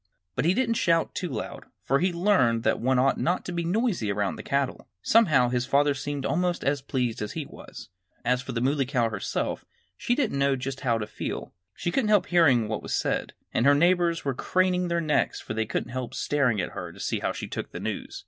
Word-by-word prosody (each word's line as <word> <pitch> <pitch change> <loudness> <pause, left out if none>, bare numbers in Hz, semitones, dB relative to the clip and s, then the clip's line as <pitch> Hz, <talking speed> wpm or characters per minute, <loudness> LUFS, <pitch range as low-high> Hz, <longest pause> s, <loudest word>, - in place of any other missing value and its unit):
But - - 0
he 175 +3 +3
didn't 230 -2 +1
shout 165 -2 +2
too 180 - -3
loud, 115 -6 -5 0.2
for 135 +1 +2
he 180 - +2
had 175 - -3
learned 170 - +3
that - - +2
one 130 +2 +2
ought 135 +2 +2
not 175 +2 0
to - - -4
be 170 -1 -2
noisy 180 - 0
around 100 0 -1
the - - -7
cattle. 140 -1 -2 0.2
Somehow 155 - +4
his 125 0 -1
father 145 +1 +3
seemed 140 0 -4
almost 180 +1 0
as 140 0 +1
pleased 125 -4 -2
as 105 - -4
he 160 -3 -4
was. - - -11 0.4
As 125 +1 +2
for 125 - -6
the 115 -1 -2
Muley 135 +1 +1
Cow 120 -4 +1
herself, 100 -2 -2 0.3
she 240 - 0
didn't 260 - 0
know 140 0 +3
just 135 +1 -5
how 120 -4 +1
to 105 - -3
feel. 105 - -5 0.2
She 175 - -2
couldn't 230 -2 +1
help 205 -4 +4
hearing 140 -11 +4
what 110 0 -3
was - - -2
said. - - -1 0.2
And 120 - +2
her 145 - +7
neighbors 170 +1 +2
were 135 - 0
craning 180 +5 +1
their 170 0 0
necks, 155 -2 +1
for - - -6
they 110 0 -1
couldn't 115 - -3
help 130 -1 -4
staring 135 -7 +1
at 90 - -2
her 90 -3 -6
to - - -15
see - - -1
how - - -1
she - - -6
took - - -5
the - - -6
news. - - -4
140 Hz, 235 wpm, -26 LUFS, 125-175 Hz, 0.4 s, her